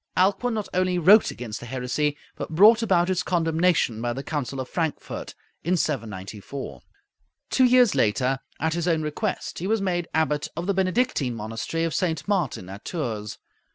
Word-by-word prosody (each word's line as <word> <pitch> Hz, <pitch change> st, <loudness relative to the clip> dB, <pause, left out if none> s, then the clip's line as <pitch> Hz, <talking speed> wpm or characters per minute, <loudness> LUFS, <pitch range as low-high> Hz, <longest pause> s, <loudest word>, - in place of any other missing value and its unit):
Alcuin 200 Hz, +6 st, +2 dB
not 215 Hz, -2 st, -3 dB
only 185 Hz, 0 st, +1 dB
wrote 195 Hz, +6 st, +6 dB
against 115 Hz, -3 st, -6 dB
the 120 Hz, -, -9 dB
heresy, 130 Hz, +4 st, -1 dB, 0.2 s
but -, -, -5 dB
brought 220 Hz, +6 st, +7 dB
about 180 Hz, -6 st, +3 dB
its 185 Hz, -1 st, +1 dB
condemnation 165 Hz, -8 st, +1 dB
by 120 Hz, 0 st, -1 dB
the 135 Hz, +3 st, -5 dB
Council 140 Hz, -3 st, -3 dB
of 130 Hz, -, -4 dB
Frankfort, 160 Hz, -1 st, -4 dB, 0.3 s
in 180 Hz, +3 st, +1 dB
794. 110 Hz, -, -4 dB, 0.7 s
Two 260 Hz, -, +5 dB
years 250 Hz, -3 st, +5 dB
later, 125 Hz, +5 st, +1 dB, 0.2 s
at 160 Hz, +1 st, 0 dB
his 170 Hz, 0 st, -2 dB
own 160 Hz, -2 st, +2 dB
request, 170 Hz, +7 st, -3 dB
he 180 Hz, -, -3 dB
was 220 Hz, +1 st, +2 dB
made 175 Hz, -3 st, -1 dB
Abbot 150 Hz, -2 st, 0 dB
of 170 Hz, -, -2 dB
the 200 Hz, -, +1 dB
Benedictine 185 Hz, -, 0 dB
monastery 115 Hz, +9 st, -3 dB
of 165 Hz, -1 st, -1 dB
St. 160 Hz, -5 st, -1 dB
Martin, 175 Hz, -, -1 dB
at 100 Hz, +2 st, -9 dB
Tours. 115 Hz, -, -4 dB
160 Hz, 170 wpm, -25 LUFS, 125-185 Hz, 0.7 s, brought